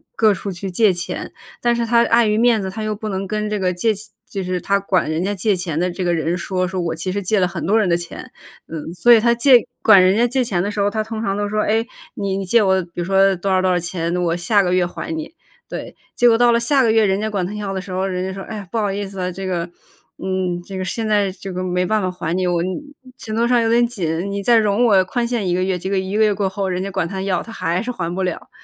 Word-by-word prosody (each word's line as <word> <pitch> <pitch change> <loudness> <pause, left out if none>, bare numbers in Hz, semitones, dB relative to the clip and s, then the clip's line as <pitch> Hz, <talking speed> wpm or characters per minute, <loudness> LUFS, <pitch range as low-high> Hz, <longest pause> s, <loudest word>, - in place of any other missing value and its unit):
各 215 -2 +4
处 195 +2 -5
去 185 +1 -6
借 210 +3 +4
钱， 175 -1 -5 0.3
但 240 0 +2
是 235 0 -1
他 235 +1 +4
碍 230 0 +4
于 210 0 +1
面 235 -1 +4
子， 190 -1 -4
他 220 - -6
又 215 0 -2
不 215 +1 -6
能 195 0 -3
跟 210 +2 -2
这 210 -1 -2
个 185 -1 +1
借 200 +5 +1
钱 210 +1 -10 0.2
就 195 - -4
是 180 0 -2
他 200 +3 +1
管 195 -4 0
人 160 +2 -1
家 205 +2 -1
借 200 +2 +1
钱 170 -4 -3
的 180 +1 0
这 185 +2 -4
个 175 - +1
人 165 0 0
说， 185 +1 -2
说 185 0 -3
我 165 -1 -2
其 170 +3 -3
实 200 +2 -2
借 200 +2 +1
了 180 - +3
很 175 - -5
多 215 +3 +4
人 210 - +2
的 170 - +3
钱， 170 0 -7 0.4
嗯。 160 0 -6
所 240 +8 +6
以 230 - +7
他 235 +2 +3
借 245 +1 +6 0.2
管 215 -4 +8
人 185 +2 +4
家 235 - +4
借 255 +2 0
钱 195 -7 -1
的 205 - -2
时 210 - -5
候， 200 0 +2
他 215 +1 -2
通 220 0 -5
常 195 -3 -1
都 205 0 -1
说 215 +1 0
哎， 220 +2 +1 0.3
你 200 -1 -2
你 195 - -2
借 225 +4 +4
我 190 -1 +3
比 175 - -11
如 175 - -2
说 195 +1 +3
多 190 +2 -2
少 185 0 +3
多 185 - +2
少 180 - +2
钱， 170 0 -3
我 170 -2 0
下 190 +4 +2
个 180 -1 0
月 185 0 +3
还 320 - -5
你， 305 -2 -6 0.4
对。 - - -7 0.2
结 245 - +5
果 230 - +6
到 240 +1 +4
了 235 - +3
下 270 +4 +3
个 230 -3 +3
月 220 -1 +4
人 195 0 +1
家 220 - -1
管 200 -4 -1
他 195 - -5
要 210 -2 -4
的 190 - -2
时 185 0 -9
候， 185 +1 -1
人 185 -1 -2
家 190 - -4
说： 195 - -7
“哎， 210 -3 -6
不 230 - -1
好 205 -2 0
意 200 +1 -3
思 195 0 -8
啊， 180 0 -2
这 190 +2 -6
个 180 -2 -1 0.5
嗯 185 -2 -2
这 195 - -8
个 185 - -3
现 220 +4 -3
在 205 -2 +2
这 190 0 -8
个 185 +1 -3
没 180 0 0
办 215 +3 +1
法 185 - -1
还 175 -2 -3
你， 185 0 0
我 175 -1 +1
嗯 - - -2 0.5
手头 225 +2 -1
上 240 -1 +3
有 225 - +1
点 240 +1 +4
紧， 180 -6 -2
你 200 0 -3
再 235 +3 +4
容 215 +1 +2
我 200 -6 +4
宽 235 +6 -1
限 235 -5 -1
1 175 - +1
个 185 +1 +1
月， 185 -1 0
结 185 +2 -5
果 200 - 0
1 190 +2 -1
个 220 - +4
月 210 -1 +3
过 195 -1 -1
后 195 0 -3
人 180 -1 -2
家 195 - -3
管 190 -3 -1
他 190 +2 -5
要 190 -3 -1
他 230 - -11
还 175 -4 -1
是 250 - -3
还 170 -8 -4
不 190 - -1
了。 180 -2 -4
195 Hz, 325 characters per minute, -20 LUFS, 180-215 Hz, 0.5 s, 管